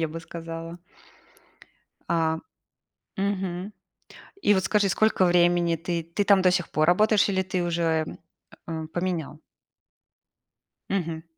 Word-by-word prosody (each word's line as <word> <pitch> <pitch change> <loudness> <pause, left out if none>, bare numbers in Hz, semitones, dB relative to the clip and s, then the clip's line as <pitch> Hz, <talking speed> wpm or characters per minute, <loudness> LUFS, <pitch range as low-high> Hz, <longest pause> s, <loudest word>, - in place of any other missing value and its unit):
я 160 - 0
бы 165 +2 -7
сказала. 165 0 -8 1.3
А. 160 -1 +1 0.8
Мгм. 190 -1 -2 0.7
И 205 - +5
вот 190 -1 +1
скажи, 205 -1 +2
сколько 215 -1 +2
времени 175 -1 +3
ты 170 +1 -3
ты 170 +5 -2
там 200 -2 +5
до 185 - +5
сих 180 -2 -1
пор 155 0 +2
работаешь 210 +3 +4
или 190 -1 +1
ты 185 -1 -2
уже, 165 -2 0 0.6
эм, 160 -1 -5
поменял? 175 -2 -3 1.5
Мгм. 165 -4 -2
175 Hz, 120 wpm, -25 LUFS, 165-190 Hz, 1.5 s, И